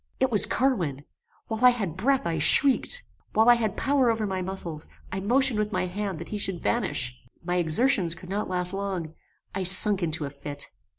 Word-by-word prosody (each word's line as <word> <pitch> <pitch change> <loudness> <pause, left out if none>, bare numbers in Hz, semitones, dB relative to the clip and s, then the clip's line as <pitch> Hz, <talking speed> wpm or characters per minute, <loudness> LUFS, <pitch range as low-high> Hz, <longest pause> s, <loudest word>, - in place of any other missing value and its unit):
It 260 -1 0
was 210 - +3
Carwin! 175 - -2 0.4
While 220 +1 -5
I 250 - +8
had 205 -10 -3
breath 265 +6 0
I 165 -2 -2
shrieked. 280 - +4 0.3
While 220 +2 +2
I - - +8
had 220 -4 -2
power 270 -3 +1
over 225 -1 -1
my 190 -2 -4
muscles, 180 -4 -4 0.2
I 190 - -4
motioned 245 +3 +2
with 210 0 -2
my 195 - -2
hand 195 0 -5
that 170 - -9
he 210 - -5
should 190 -3 -2
vanish. 190 - -2 0.3
My 175 +1 -2
exertions 175 - +3
could 180 - -14
not 205 +1 -4
last 180 0 0
long; 190 -5 -5 0.4
I 195 - -4
sunk 190 +2 +6
into 160 -3 -3
a 140 - -7
fit. 145 0 -6
195 Hz, 195 wpm, -25 LUFS, 170-230 Hz, 0.4 s, I